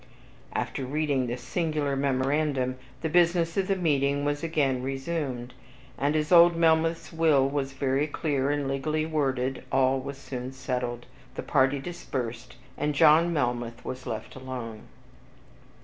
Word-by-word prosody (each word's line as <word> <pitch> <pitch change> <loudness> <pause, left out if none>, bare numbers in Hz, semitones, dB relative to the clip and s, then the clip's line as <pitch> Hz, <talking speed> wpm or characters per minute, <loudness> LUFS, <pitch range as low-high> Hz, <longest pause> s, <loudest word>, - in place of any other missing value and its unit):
After 135 - -2
reading 140 -1 0
this 120 +1 -4
singular 150 -1 -1
memorandum, 135 -1 0 0.3
the - - +1
business 170 0 +3
of 195 -1 +1
the 195 - +2
meeting 145 -5 +1
was 145 0 -1
again 145 -6 +1
resumed; 135 -2 -3 0.4
and 145 +2 0
as 155 +1 0
old 170 -1 +8
Melmoth's 165 0 +2
will 155 -5 +4
was 135 -1 -2
very 135 +2 0
clear 145 -3 -1
and 145 -1 0
legally 155 +3 -1
worded, 135 -4 -1
all 130 0 +3
was 140 +1 -6
soon 130 -2 -6
settled, 125 -2 -3 0.3
the - - -4
party 135 0 +2
dispersed, 130 -7 -5 0.2
and 150 0 0
John 160 +3 +6
Melmoth 120 -5 -2
was 130 0 -6
left 110 - -5
alone. 125 -4 -7
140 Hz, 140 wpm, -27 LUFS, 130-155 Hz, 0.4 s, old